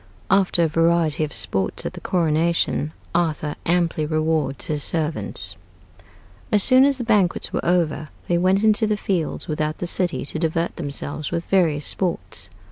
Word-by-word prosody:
AFTER 190 -3 +3
A - - +3
VARIETY 165 -1 +2
OF 150 - -9
SPORTS 95 -1 -2
AT - - -3
THE - - -9
CORONATION, 165 -2 0 0.2
ARTHUR 160 -3 0
AMPLY 170 -3 +1
REWARDS 155 -3 -1
HIS 150 -1 -2
SERVANTS 160 -1 -3 1.0
As 210 -3 +5
soon 260 +1 +6
as 280 -1 +2
the 245 - -3
banquets 210 -6 +1
were - - -1
over 160 -4 0 0.2
they 175 -1 +2
went 190 +3 +2
into 220 0 +4
the 210 0 0
fields 185 -6 -2
without 155 0 -2
the - - -4
city 175 -2 -1
to 155 - -3
divert 165 +1 -1
themselves 145 -1 -4
with 170 0 -3
various 160 -6 +1
sports. 95 - 0
165 Hz, 160 wpm, -22 LUFS, 155-185 Hz, 1.0 s, soon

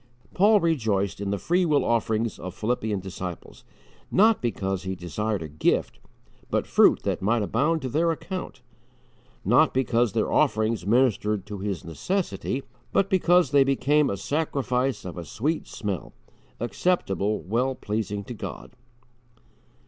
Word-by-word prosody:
Paul 205 +3 +5
rejoiced 110 - 0
in 100 - -2
the 100 - 0
free 175 - +1
will 150 -4 +2
offerings 115 -1 0
of 90 - -7
Philippian 110 -3 -1
disciples, 90 -2 -7 0.5
not 220 +2 +4
because 95 -5 -2
he 95 0 -4
desired 95 +3 -3
a - - -5
gift, 75 +1 0 0.5
but - - 0
fruit - - +4
that - - -1
might 110 +3 +2
abound 145 +9 +1
to - - -1
their 160 +6 +1
account; 175 -5 -6 0.8
not 155 -4 +4
because 120 -4 +2
their - - 0
offerings 110 -3 +1
ministered 105 -4 +2
to 105 -2 -7
his 100 -2 -4
necessity, 140 - -2 0.3
but 195 +2 +1
because 180 -5 +4
they 140 -1 +6
became 140 +2 +2
a 100 - -2
sacrifice 135 -3 -1
of 90 -1 -6
a - - -5
sweet 150 - -2
smell 100 -5 -5 0.5
acceptable, 110 - 0
well 125 +7 0
pleasing 105 -2 -3
to 120 - -7
God. 110 - -7
115 Hz, 140 wpm, -25 LUFS, 100-145 Hz, 0.8 s, they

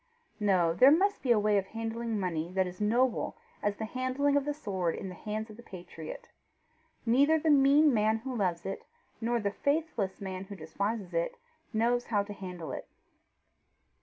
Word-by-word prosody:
No; 185 -5 +3
there 255 +10 +7
must 390 +7 +3
be 255 - +1
a 235 - +6
way 210 -1 +3
of 195 - -5
handling 225 +1 -3
money 170 -3 -2
that 190 0 +2
is 180 +2 -8
noble 240 - +1 0.2
as 205 0 0
the 220 - -4
handling 255 +4 0
of 285 -1 +2
the 295 - 0
sword 190 - -2
in 190 - -5
the - - -7
hands 215 +4 -5
of 215 - -12
the - - -11
patriot. 360 - -9 0.8
Neither 280 +7 +4
the 315 0 +2
mean 285 +1 +6
man 220 0 +3
who 255 +3 -5
loves 180 -6 -1
it, 195 - -4 0.4
nor 235 +1 +1
the 200 -2 -1
faithless 280 -6 -1
man 190 -1 -5
who 200 +1 -8
despises 195 +3 -3
it, 170 0 -1 0.3
knows 240 +2 +1
how 205 -3 +1
to 205 0 -8
handle 180 -6 -7
it. - - -6
215 Hz, 185 wpm, -30 LUFS, 190-255 Hz, 0.8 s, there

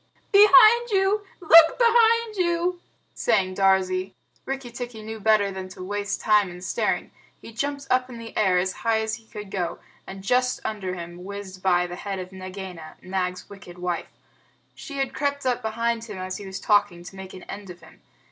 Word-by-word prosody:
"Behind 425 +4 +7
you! 400 +1 +2 0.2
Look 325 -1 +7
behind 465 -1 +4
you!" 350 -1 0 0.3
sang 195 -5 +1
Darzee. 190 -1 +1 0.3
Rikki 270 -2 -5
tikki 240 -2 -7
knew 220 +1 -7
better 210 -1 +3
than 190 -1 -7
to 185 0 -9
waste 205 +1 -3
time 210 -3 +3
in 175 0 -10
staring. - - -1 0.3
He 225 - -12
jumped 280 +4 -3
up 255 0 +2
in 240 - -9
the 230 -1 -10
air 190 -4 +3
as 185 +1 0
high 225 -1 +1
as 220 0 -3
he 225 -1 -21
could 210 -2 -9
go, 175 -4 -2 0.3
and 190 0 -9
just 250 +4 +1
under 190 -4 -3
him 175 0 -8
whizzed 195 -1 -8
by 180 -2 +3
the 175 0 -7
head 200 -1 -4
of 185 0 -7
Nagaina, 185 -3 -9
Nag's 185 -1 -3
wicked 180 -3 -12
wife. 180 -1 -3 0.6
She 280 - -9
had 270 -1 -1
crept 285 -1 -2
up 250 -1 0
behind 230 +1 -1
him 210 -4 -8
as 185 0 -5
he 200 - -9
was 190 0 -6
talking, 200 -5 +2
to 180 - -11
make 190 -1 -9
an 185 - -11
end 200 -1 -9
of 175 0 -11
him. - - -18
205 Hz, 190 wpm, -24 LUFS, 185-255 Hz, 0.6 s, Behind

